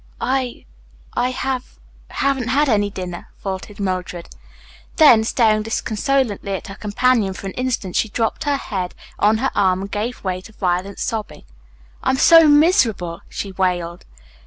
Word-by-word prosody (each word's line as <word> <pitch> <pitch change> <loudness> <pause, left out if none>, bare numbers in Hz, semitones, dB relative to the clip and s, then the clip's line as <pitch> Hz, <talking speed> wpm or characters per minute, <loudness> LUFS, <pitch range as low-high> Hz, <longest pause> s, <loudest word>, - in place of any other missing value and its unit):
"I 260 -2 -2 0.5
I 245 +1 +1
have 255 0 -3 0.3
haven't 270 -3 0
had 285 +4 +2
any 205 -4 +2
dinner," 180 -3 -7
faltered 195 +1 -6
Mildred. 185 -3 -3 0.7
Then, 265 -9 +7
staring 220 -2 +2
disconsolately 225 -1 -1
at - - -6
her - - -6
companion 210 -1 +1
for 195 - -9
an 195 - -4
instant, 250 -8 -2
she 220 - +1
dropped 225 +8 -2
her 285 -1 +1
head 185 -8 -4 0.2
on 210 +2 +4
her 265 +4 0
arm 185 -2 +2
and 195 0 -6
gave 225 +4 -3
way 185 -1 -2
to 220 - -14
violent 185 0 -1
sobbing. 215 -10 -4 0.6
"I - - 0
am 265 - +2
so 330 +3 +7
miserable," 290 - +3
she 200 - -5
wailed. 180 -2 -2
215 Hz, 155 wpm, -20 LUFS, 190-255 Hz, 0.7 s, Then